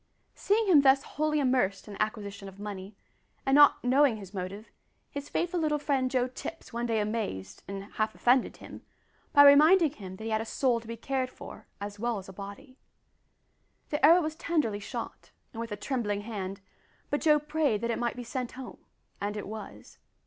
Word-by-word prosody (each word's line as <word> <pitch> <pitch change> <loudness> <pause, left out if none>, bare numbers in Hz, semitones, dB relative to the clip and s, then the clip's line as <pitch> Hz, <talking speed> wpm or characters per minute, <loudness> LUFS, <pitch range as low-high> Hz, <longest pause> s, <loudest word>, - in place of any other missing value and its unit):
Seeing 435 +3 +1
him 340 -8 +6
thus 270 0 +5
wholly 305 0 -1
immersed 250 -9 +1
in 210 - -8
the - - -5
acquisition 205 -2 -3
of 195 +1 -16
money, 205 -1 -7 0.5
and 270 - +2
not 290 0 +6
knowing 260 -1 +4
his 195 -1 -11
motive, 195 +3 -6 0.4
his 285 0 -6
faithful 350 +1 -1
little 305 -2 +1
friend 275 -3 0
Joe 250 -1 +1
Tipps 255 +2 -8
one 235 +1 -2
day 225 -2 +1
amazed, 210 - -3
and 195 0 -5
half 215 +1 -3
offended 250 +1 +2
him, - - -11 0.5
by 285 - +8
reminding 310 +3 +7
him 190 -9 -9
that 220 - -10
he 225 - -3
had 220 0 +1
a - - -5
soul 245 0 +1
to 230 - -15
be 230 0 -6
cared 260 +2 -2
for - - -11
as 205 0 -6
well 235 0 -1
as 190 - -8
a 190 - -10
body. 205 +8 -10 1.1
The 295 -2 -2
arrow 335 +4 +8
was 310 -1 -2
tenderly 300 -11 -1
shot, 200 - -7 0.2
and 225 - -7
with 230 -1 -6
a 210 - -3
trembling 210 -7 -2
hand, 200 -3 -5 0.5
but 290 - 0
Joe 305 -2 +5
prayed 295 -7 0
that 235 0 -1
it - - -2
might 240 -1 -1
be 245 - -6
sent 245 +1 -4
home, 265 +1 -9 0.4
and 205 +1 -2
it 205 - -5
was. 215 +1 -9
235 Hz, 200 wpm, -29 LUFS, 205-285 Hz, 1.1 s, by